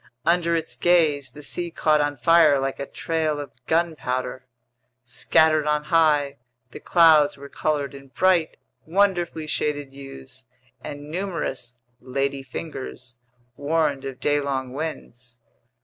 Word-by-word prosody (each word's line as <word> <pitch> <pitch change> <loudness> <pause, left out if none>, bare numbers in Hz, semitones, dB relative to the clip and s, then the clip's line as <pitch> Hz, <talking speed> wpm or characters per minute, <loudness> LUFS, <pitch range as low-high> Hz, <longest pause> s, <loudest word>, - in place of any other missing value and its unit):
Under 170 0 +2
its 165 -1 -3
gaze, 155 -6 +2
the 145 +4 -12
sea 175 +4 -4
caught 155 -2 +2
on 145 -1 -1
fire 155 +2 +5
like 135 0 -2
a 140 - -4
trail 160 -2 -2
of 145 - -7 0.2
gunpowder. 130 -6 -1 0.6
Scattered 155 +5 +2
on 150 0 +1
high, 150 -4 +3 0.3
the - - -9
clouds 160 -5 +5
were 140 +1 -10
colored 145 -2 -1
in 140 0 -12
bright, 175 +3 +2 0.3
wonderfully 175 -3 +1
shaded 145 -2 -2
hues, 130 - -11 0.4
and 145 +1 -8
numerous 165 -9 -3 0.3
"ladyfingers" 135 0 -4 0.4
warned 145 -1 0
of 135 -2 -6
daylong 140 -3 -1
winds. 125 -5 -7
145 Hz, 120 wpm, -24 LUFS, 135-160 Hz, 0.6 s, fire